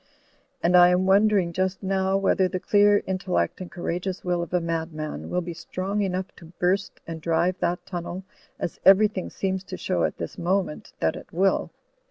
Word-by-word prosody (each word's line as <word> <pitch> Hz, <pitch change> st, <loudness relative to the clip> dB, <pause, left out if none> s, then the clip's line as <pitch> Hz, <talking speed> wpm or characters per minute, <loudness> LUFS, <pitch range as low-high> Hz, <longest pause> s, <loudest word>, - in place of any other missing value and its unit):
And 175 Hz, +2 st, +4 dB
I 175 Hz, 0 st, +9 dB
am 180 Hz, +1 st, +2 dB
wondering 195 Hz, -2 st, +3 dB
just 185 Hz, +2 st, -1 dB
now 190 Hz, 0 st, +1 dB
whether 195 Hz, -1 st, +2 dB
the 185 Hz, 0 st, -3 dB
clear 205 Hz, +1 st, +4 dB
intellect 185 Hz, 0 st, -1 dB
and 180 Hz, -, -6 dB
courageous 180 Hz, +2 st, -4 dB
will 175 Hz, -1 st, 0 dB
of 170 Hz, -, -5 dB
a 180 Hz, -, +2 dB
madman 160 Hz, -2 st, -4 dB
will 180 Hz, -, 0 dB
be 170 Hz, 0 st, -6 dB
strong 185 Hz, +5 st, -3 dB
enough 190 Hz, -1 st, -2 dB
to 165 Hz, 0 st, -14 dB
burst 195 Hz, +2 st, 0 dB
and 165 Hz, -1 st, -7 dB
drive 170 Hz, +3 st, +1 dB
that 175 Hz, +1 st, -1 dB
timnel, 175 Hz, +1 st, -5 dB, 0.3 s
as -, -, -4 dB
everything 195 Hz, -1 st, +5 dB
seems 190 Hz, -1 st, -2 dB
to 185 Hz, -1 st, -7 dB
show 185 Hz, -, -1 dB
at -, -, -1 dB
this -, -, -6 dB
moment 180 Hz, -2 st, -1 dB
that 80 Hz, -, +1 dB
it -, -, -11 dB
will. 190 Hz, +3 st, +1 dB
185 Hz, 185 wpm, -25 LUFS, 175-195 Hz, 0.3 s, I